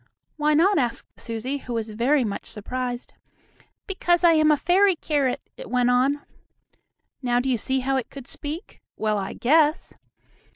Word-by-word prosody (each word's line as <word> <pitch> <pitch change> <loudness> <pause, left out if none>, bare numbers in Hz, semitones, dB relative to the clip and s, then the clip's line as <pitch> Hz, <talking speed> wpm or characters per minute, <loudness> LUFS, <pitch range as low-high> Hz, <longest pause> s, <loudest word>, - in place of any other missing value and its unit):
"Why 300 0 +2
not?" 365 +3 +4
asked 240 -3 -3
Susie, 240 +5 -4
who 245 - -7
was 225 -1 -3
very 250 +6 +2
much 205 -3 -4
surprised. 245 +3 -5 0.7
"Because 350 -3 +1
I 340 - +7
am 310 -1 +4
a 300 - +4
fairy 370 +5 +3
carrot," 285 -5 -1 0.2
it - - -9
went 250 0 +2
on. 270 +4 +1 1.0
Now 245 -2 +1
do 250 - -2
you 255 -2 +2
see 265 +4 0
how 270 +1 0
it 255 - -3
could 275 -3 -10
speak? 300 - -7 0.2
Well, 215 -1 0
I 195 - -4
guess! 305 +4 +2
270 Hz, 165 wpm, -24 LUFS, 245-310 Hz, 1.0 s, I